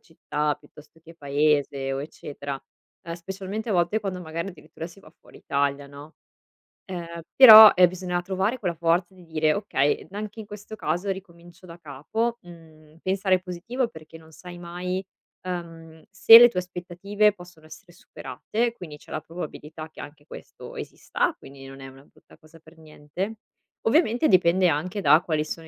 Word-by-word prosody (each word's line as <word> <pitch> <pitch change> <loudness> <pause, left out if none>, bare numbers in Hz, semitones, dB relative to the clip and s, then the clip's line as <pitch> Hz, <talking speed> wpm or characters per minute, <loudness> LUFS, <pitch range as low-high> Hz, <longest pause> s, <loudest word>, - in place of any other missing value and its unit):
città 150 -2 -3
piuttosto 150 +2 -19
che 165 +1 -15
Paese 145 -2 0
o 135 - -3
eccetera. 140 -2 -7 0.4
Ehm, 165 - -7
specialmente 190 +5 -6
a - - 0
volte 180 +4 +1
quando 190 -3 -4
magari 165 +2 -5
addirittura 160 -2 -10
si 175 +3 -16
va 155 - -17
fuori - - -18
Italia, 140 0 -1
no, 145 +3 -13 0.7
ehm, 170 -2 -7
però, 220 -5 +11
ehm, 180 0 +6
bisogna 180 0 -3
trovare 190 +6 -1
quella 175 -4 -2
forza 170 +3 0
di 185 -1 -17
dire: 155 -1 +1
"Okay, 145 -8 -1
n 195 - -13
anche 210 +1 -6
in 215 - -11
questo 210 +1 -10
caso 180 +1 -2
ricomincio 175 -2 -11
da 165 - -11
capo", 220 - -3
mhmm, 160 -3 -17
pensare 190 0 +1
positivo 195 +8 -4
perché 160 -1 -13
non 160 0 -18
sai 175 +2 -11
mai, 180 +2 -5 0.4
ehm, 165 -3 -8
se 225 +3 +9
le 240 - +9
tue 180 - -2
aspettative 180 +4 -1
possono 175 -4 -16
essere - - -14
superate, 235 +2 -4
quindi 160 -9 -10
c'è - - -18
la 155 - -3
probabilità 155 -1 -8
che - - -16
anche 145 0 -12
questo - - -12
esista, - - -3
quindi 135 0 -13
non 135 0 -12
è 135 - -9
una 135 +1 -15
brutta - - -22
cosa 155 +1 -19
per 160 +1 -20
niente. 160 +7 -7 0.5
Ovviamente 245 +1 +2
dipende 185 0 +4
anche 180 +7 -2
da 155 - +6
quali 155 -3 -1
sono 160 +1 -8
170 Hz, 170 wpm, -25 LUFS, 155-190 Hz, 0.7 s, però